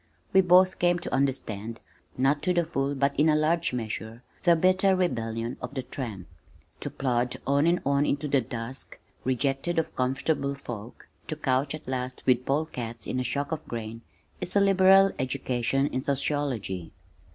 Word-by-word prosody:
We 190 - +7
both 185 +1 +5
came 175 0 +3
to 175 - -6
understand 115 -5 -1 0.4
(not 135 +3 +2
to 180 +1 +1
the 170 -1 +2
full, 140 -3 -1
but 140 +1 +1
in 155 +2 +5
a 150 - +4
large 165 +2 +2
measure) 115 0 -5 0.2
the 170 -1 +5
bitter 185 +3 +4
rebellion 115 -9 -1
of 125 +3 -6
the 130 - -2
tramp. 115 -8 -6 0.5
To - - -4
plod 125 -2 -1
on 140 +3 +3
and 175 +1 +2
on 140 +1 +2
into 145 +1 -1
the 135 -2 +3
dusk, 120 +2 -6 0.3
rejected 135 +6 0
of 165 - -1
comfortable 140 +2 0
folk, 120 -4 -9 0.2
to 155 - -3
couch 135 0 0
at 155 - -12
last 130 -1 -4
with 125 -1 +2
pole 145 +3 +1
cats 115 -6 -5
in 130 - -2
a - - 0
shock 140 +4 -2
of 160 -1 -3
grain 115 -1 -5 0.4
is 180 +2 -1
a - - +6
liberal 195 0 +6
education 130 0 0
in 130 -2 -2
sociology. 135 - -2
135 Hz, 175 wpm, -27 LUFS, 125-160 Hz, 0.5 s, We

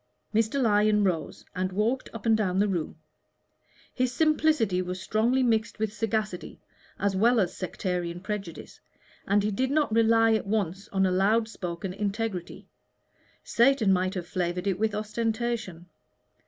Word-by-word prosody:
Mr. 225 +5 +1
Lyon 210 -3 +3
rose 180 -5 -2
and 185 +1 -1
walked 220 +7 -1
up 225 -3 -9
and 225 -1 +5
down 190 -4 0
the 205 +2 +3
room. 175 -6 -2 1.0
His 255 -1 0
simplicity 305 - +2
was 180 0 -4
strongly 235 +6 +1
mixed 225 -2 +1
with 215 -1 -2
sagacity 215 -4 -3 0.4
as 200 0 0
well 235 +5 +4
as 185 -4 0
sectarian 180 -2 -3
prejudice, 195 -3 -6 0.5
and 200 +1 +3
he 210 - 0
did 255 +6 0
not 290 -5 +1
rely 225 0 +4
at 215 -2 -1
once 195 -2 -2
on 190 -1 +1
a 185 - +1
loud 210 +5 +2
spoken 180 -3 -5
integrity 205 -2 -4 0.8
Satan 235 -5 +3
might 185 +1 0
have 180 -2 -3
flavored 180 +1 -2
it 195 -2 0
with 215 -1 0
ostentation. 220 -4 -2
210 Hz, 150 wpm, -27 LUFS, 185-225 Hz, 1.0 s, and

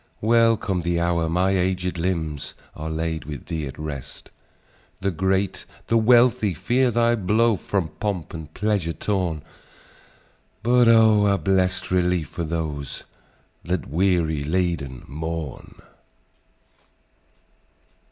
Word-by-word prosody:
Welcome 115 -4 +3
the 85 0 0
hour 85 -1 +1
my 90 +3 +2
aged 90 -1 0
limbs 80 -5 -2 0.2
Are 80 +1 -5
laid 80 0 -3
with 75 -3 -7
thee 80 -4 -3
at 65 - -9
rest! 75 -4 -7 0.7
The 100 0 0
great, 95 +2 0 0.2
the 115 - 0
wealthy 115 -4 +4
fear 125 +8 +2
thy 120 0 +2
blow 110 +2 +2
From 95 -2 -2
pomp 100 -6 -3
and 80 -2 -8
pleasure 100 -5 0
torn; 90 -8 -2 1.2
But, 120 +1 +4
oh! 110 -2 +6
a 100 -1 +3
blest 95 -2 0
relief 90 -3 +1
for 85 - -4
those 75 -4 -4 0.6
That 90 0 -3
weary 85 -3 +1
laden 80 -6 -2
mourn!" 80 -1 -6
90 Hz, 115 wpm, -23 LUFS, 80-105 Hz, 1.2 s, oh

